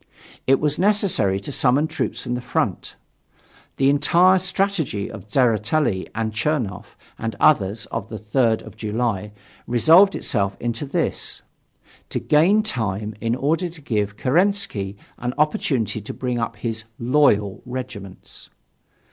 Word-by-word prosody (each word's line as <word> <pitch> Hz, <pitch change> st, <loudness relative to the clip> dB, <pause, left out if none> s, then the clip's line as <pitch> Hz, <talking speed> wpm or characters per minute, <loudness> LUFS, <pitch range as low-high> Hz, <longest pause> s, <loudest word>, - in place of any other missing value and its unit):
It 135 Hz, +1 st, +5 dB
was 150 Hz, -1 st, 0 dB
necessary 190 Hz, -, +2 dB
to 120 Hz, -, -6 dB
summon 135 Hz, +2 st, +2 dB
troops 160 Hz, -, -3 dB
from 120 Hz, -, -3 dB
the 125 Hz, -, -2 dB
front. 125 Hz, -, -2 dB, 0.8 s
The 135 Hz, -, +3 dB
entire 175 Hz, +6 st, +4 dB
strategy 185 Hz, -, -1 dB
of 105 Hz, -2 st, -10 dB
Tseretelli, 115 Hz, -1 st, +1 dB, 0.3 s
Chernoff, 115 Hz, -4 st, -2 dB, 0.2 s
and 115 Hz, 0 st, -3 dB
others 110 Hz, -6 st, +3 dB
on 100 Hz, -, -3 dB
the 110 Hz, -, -6 dB
3rd 110 Hz, +2 st, +1 dB
of 110 Hz, -2 st, -12 dB
July 110 Hz, -2 st, -2 dB, 0.4 s
resolved 165 Hz, -, +5 dB
itself 100 Hz, -1 st, -1 dB
into 120 Hz, +4 st, -3 dB
this: 135 Hz, -, -2 dB, 0.7 s
to -, -, -2 dB
gain 185 Hz, +9 st, +4 dB
time 110 Hz, -, -2 dB
in 115 Hz, +1 st, 0 dB
order 160 Hz, +7 st, 0 dB
to 165 Hz, -1 st, -13 dB
give 105 Hz, -7 st, -2 dB
Kerensky 150 Hz, -, 0 dB, 0.2 s
an 125 Hz, +1 st, -3 dB
opportunity 135 Hz, -7 st, 0 dB
to 105 Hz, -, -7 dB
bring 125 Hz, -2 st, -2 dB
up 115 Hz, 0 st, -2 dB
his 110 Hz, +1 st, -4 dB
"loyal" 115 Hz, -6 st, +2 dB
regiments. 120 Hz, -7 st, -8 dB
120 Hz, 130 wpm, -22 LUFS, 105-150 Hz, 0.8 s, It